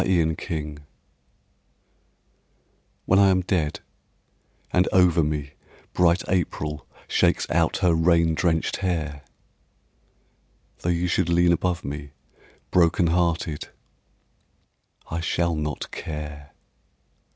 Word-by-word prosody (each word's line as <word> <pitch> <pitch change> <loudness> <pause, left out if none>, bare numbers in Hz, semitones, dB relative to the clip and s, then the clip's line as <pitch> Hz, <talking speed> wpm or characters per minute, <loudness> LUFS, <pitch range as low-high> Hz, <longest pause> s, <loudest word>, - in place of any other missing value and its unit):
I - - 0
SHALL 90 -4 +3
NOT 80 -1 -2
CARE 75 -2 -4 2.3
WHEN 95 - +4
I 100 -1 +6
am 95 -1 +3
dead 90 -5 -1 0.9
and 90 0 +3
over 90 -2 +4
me 75 -2 -3 0.4
bright 85 0 +3
April 75 -4 -2 0.2
Shakes - - +2
out 80 +1 +2
her 85 - +5
rain 85 0 +3
drenched 80 0 0
hair, 80 -7 -2 1.6
Tho' 85 - -2
you 85 +1 +1
should 90 -1 0
lean 85 0 +4
above 90 0 -1
me 70 0 -6 0.6
broken 85 0 +3
hearted, 85 -3 0 1.4
I 85 - -2
shall 85 +1 0
not 75 -1 -4
care. 75 -2 -7
85 Hz, 105 wpm, -24 LUFS, 75-90 Hz, 2.3 s, I